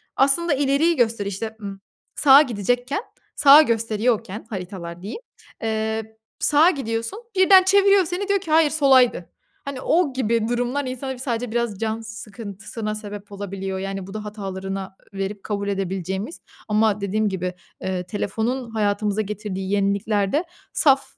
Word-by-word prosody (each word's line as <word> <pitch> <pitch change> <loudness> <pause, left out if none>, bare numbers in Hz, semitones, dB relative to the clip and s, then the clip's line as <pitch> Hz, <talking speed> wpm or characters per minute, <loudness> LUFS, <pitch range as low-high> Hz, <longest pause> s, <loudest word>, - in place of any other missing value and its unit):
aslında 290 +5 +3
ileriyi 285 +4 +2
göster 230 -4 +1
işte, 215 +3 -4
ımm, 195 -1 -6 0.4
sağa 280 -1 +8
gidecekken, 245 - -1 0.3
sağa 290 +1 +9
gösteriyorken 225 -3 0
haritalar 180 -3 -6
diyeyim, 215 - -6 0.4
eee, 220 0 -2 0.2
sağa 305 +4 +5
gidiyorsun 230 - -3 0.2
birden 375 0 +7
çeviriyor 395 0 +5
seni 360 +4 -3
diyor 400 0 +2
ki 330 -4 -7
hayır 315 -1 +5
solaydı. 265 - +3 0.4
Hani, 280 -2 -5
o 325 -5 +2
gibi 230 -3 0
durumlar 245 +3 -1
insana 255 +1 -4
sadece 245 -2 -3
biraz 235 -4 -1
can 225 0 -2
sıkıntısına 215 0 -7
sebep 205 -1 -8
olabiliyor. 195 -1 -5
Yani, 195 -1 -5
bu 195 - -9
da 215 0 -5
hatalarına 195 -2 -5 0.2
verip 195 +1 -4
kabul 200 -1 -3
edebileceğimiz. 190 - -3 0.3
Ama 215 -1 +2
dediğim 210 +2 0
gibi, 185 -1 -3 0.3
eee, 185 -1 -2
telefonun 225 +6 -2
hayatımıza 210 -1 0
getirdiği 200 -2 -4
yeniliklerde 200 - +1 0.3
saf 275 -3 +4
220 Hz, 135 wpm, -22 LUFS, 200-265 Hz, 0.4 s, sağa